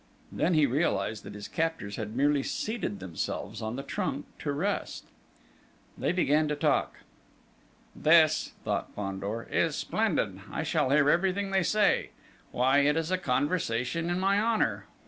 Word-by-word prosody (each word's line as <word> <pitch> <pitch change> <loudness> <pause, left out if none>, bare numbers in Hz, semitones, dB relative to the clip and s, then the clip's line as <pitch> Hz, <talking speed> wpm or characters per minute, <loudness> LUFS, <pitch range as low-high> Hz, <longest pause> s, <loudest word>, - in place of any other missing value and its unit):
Then 175 +1 +1
he 155 -2 +5
realised 110 -7 0
that - - -8
his 105 0 -7
captors 160 -11 -2
had 110 0 -5
merely 145 +2 +3
seated 210 - -3
themselves 95 +4 -4
on 110 +1 -3
the 135 - -5
trunk 140 0 -3
to 145 - -2
rest! 185 +9 -2 0.9
They - - 0
began 155 -3 +2
to 150 - -1
talk. 145 -1 0 0.9
"This," 155 -1 +4
thought - - -2
Fandor, 100 +3 -4
"is - - +1
splendid! - - -1
I - - -2
shall - - +1
hear 145 +1 +4
everything 190 +5 +2
they 195 0 +3
say. 210 +3 +2 0.4
Why, 130 +3 +3
it 145 +2 +3
is 165 +2 -1
a 185 - +2
conversation 145 +1 0
in 175 +1 0
my 195 +2 +2
honour! 225 0 0
145 Hz, 150 wpm, -29 LUFS, 115-175 Hz, 0.9 s, he